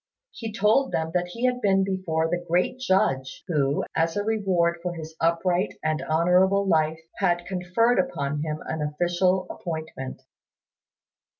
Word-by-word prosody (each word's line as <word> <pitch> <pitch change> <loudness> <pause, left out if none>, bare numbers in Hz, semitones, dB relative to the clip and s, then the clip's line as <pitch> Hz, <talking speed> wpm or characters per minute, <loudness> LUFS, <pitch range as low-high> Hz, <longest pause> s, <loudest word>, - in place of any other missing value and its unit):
He 225 -2 -6
told 220 +6 +2
them 160 0 -1
that 180 0 0
he 230 +8 -3
had 250 0 +1
been 195 -2 +3
before 185 -4 -1
the 175 +1 -2
Great 180 +9 0
Judge, 135 - 0
who, 145 -4 +1
as 165 +3 +1
a 205 - 0
reward 185 -6 +1
for 175 0 -3
his 160 -1 -8
upright 175 +3 +1
and 155 0 0
honourable 180 +5 +3
life, 160 -2 +2 0.2
had 175 -3 +1
conferred 190 +6 +1
upon 150 - -1
him 155 0 -3
an 160 -1 -3
official 175 +5 +1
appointment. 160 -6 -6
175 Hz, 145 wpm, -25 LUFS, 160-195 Hz, 0.2 s, been